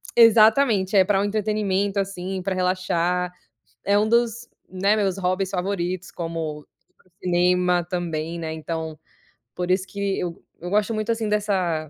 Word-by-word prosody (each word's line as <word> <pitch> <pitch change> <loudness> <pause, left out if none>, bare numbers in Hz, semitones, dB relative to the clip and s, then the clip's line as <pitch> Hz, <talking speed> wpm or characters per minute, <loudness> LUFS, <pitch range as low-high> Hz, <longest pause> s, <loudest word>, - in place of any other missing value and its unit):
Exatamente, 220 -3 +5
é 190 - +7
para 195 0 +1
o 200 - +1
entretenimento 205 -1 0
assim, 190 -1 -3
para 190 +1 -2
relaxar. 180 -1 0 0.5
É 200 +1 +3
um 215 +1 +2
dos, 235 0 +1 0.2
né, 195 +3 +1
meus 195 -3 0
hobbies 185 +1 -1
favoritos 180 -1 -2
como, 165 -3 -5 0.6
cinema 180 0 +2
também, 170 -2 -3
né, 160 -1 -4
então, 160 0 -5 0.6
por 180 0 -2
isso 185 0 +1
que 200 -1 -2
eu 175 -2 -5 0.2
eu 175 - -6
gosto 210 +3 +1
muito 215 +1 -1
assim 225 -1 -1
dessa 185 -7 0
185 Hz, 145 wpm, -23 LUFS, 175-205 Hz, 0.6 s, é